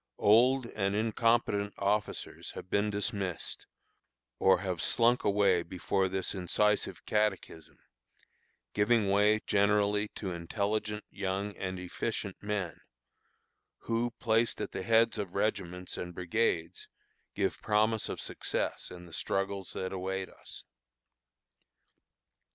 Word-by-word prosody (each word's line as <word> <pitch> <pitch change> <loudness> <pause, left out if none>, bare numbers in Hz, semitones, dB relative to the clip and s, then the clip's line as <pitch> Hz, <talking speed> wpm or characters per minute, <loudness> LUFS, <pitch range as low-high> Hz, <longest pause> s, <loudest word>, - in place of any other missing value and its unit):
Old 125 +5 +5
and 100 -3 -1
incompetent 110 -2 +1
officers 100 +1 -1
have 90 - -9
been 100 +1 +2
dismissed, 100 -4 -3 0.7
or 95 -2 +5
have 90 -4 -2
slunk 120 +1 +3
away 100 -3 +3
before 95 +2 -1
this 95 0 -1
incisive 105 +3 0
catechism, 100 -7 -1 1.0
giving 105 -1 +3
way 105 +2 +4
generally 105 +1 +3
to 95 -3 -4
intelligent, 105 +5 -2
young, 100 +1 -2
and 95 -1 -4
efficient 95 +2 -3
men, 105 -5 -3 1.0
who, 115 +1 0
placed 115 0 +2
at - - -3
the - - -4
heads 115 +3 +3
of 95 -3 -4
regiments 90 -3 -2
and 90 -1 -6
brigades, 90 -2 -1 0.5
give 100 -2 -1
promise 110 +1 +2
of - - -4
success - - -3
in 90 -1 -10
the 85 - -14
struggles 95 +2 -2
that 95 0 -3
await 95 0 -3
us. - - -12
100 Hz, 115 wpm, -31 LUFS, 95-105 Hz, 1.0 s, Old